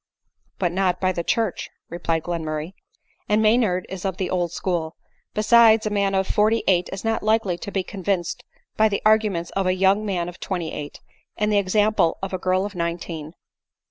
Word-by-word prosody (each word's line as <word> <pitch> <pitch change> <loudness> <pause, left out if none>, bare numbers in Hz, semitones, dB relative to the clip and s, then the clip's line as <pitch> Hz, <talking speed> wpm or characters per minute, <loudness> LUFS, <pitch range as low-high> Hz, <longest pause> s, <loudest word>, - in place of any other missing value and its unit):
" - - -52
But 175 -3 0
not 185 0 0
by 185 -1 +1
the 170 -2 -3
church," 220 0 -1 0.2
replied 165 -1 -2
Glenmurray, 160 0 -4 0.3
" - - -41
and 210 +1 +3
Maynard 215 -4 +2
is 190 -1 -7
of 190 -2 -2
the 185 - -2
old 175 -2 0
school; 170 -3 -2 0.4
beides, 220 0 +5
a 215 - -1
man 200 -1 +1
of 190 0 +2
forty 215 +3 +2
eight 180 -2 +3
is 195 +2 -6
not 225 0 0
likely 215 -4 +1
to 200 - -6
be 190 -1 -1
convinced 190 -2 -3 0.3
by 220 0 +4
the 200 - -2
arguments 215 -6 +2
of 195 -1 -1
a 185 - +2
young 195 +3 +3
man 180 -5 -2
of 180 +1 -9
twenty 175 -4 -3
eight, 145 -1 -7 0.4
and 210 0 +1
the 205 - +4
example 205 -2 +2
of 195 - -4
a 185 - -2
girl 185 +1 +1
of 205 - -6
nineteen." 170 -2 -4
190 Hz, 200 wpm, -23 LUFS, 175-210 Hz, 0.4 s, beides